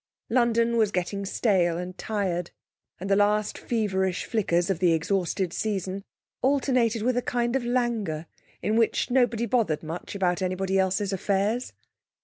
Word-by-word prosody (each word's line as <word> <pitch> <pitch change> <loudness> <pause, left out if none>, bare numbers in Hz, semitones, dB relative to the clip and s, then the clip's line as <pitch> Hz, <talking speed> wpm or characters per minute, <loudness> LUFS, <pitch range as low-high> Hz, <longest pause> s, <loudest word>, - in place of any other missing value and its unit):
London 235 -1 +3
was 215 -3 +3
getting 195 +2 -2
stale 180 -6 +2
and 180 +1 -5
tired, 185 -6 -2 0.5
and 190 - -5
the 195 - +3
last 210 +1 +2
feverish 190 -5 -1
flickers 180 -5 +1
of 175 - -2
the 175 -2 +4
exhausted 180 +1 0
season 195 -2 -2 0.4
alternated 255 -5 +2
with 250 +1 +1
a - - +2
kind 240 0 -1
of 270 - 0
languor 235 -10 -1 0.4
in 215 +1 +1
which 230 +2 +1
nobody 240 -2 +2
bothered 230 -12 0
much 165 +5 -6
about 180 -2 0
anybody 190 +1 0
else's 190 +1 +1
affairs. 200 +5 0
200 Hz, 145 wpm, -26 LUFS, 185-235 Hz, 0.5 s, the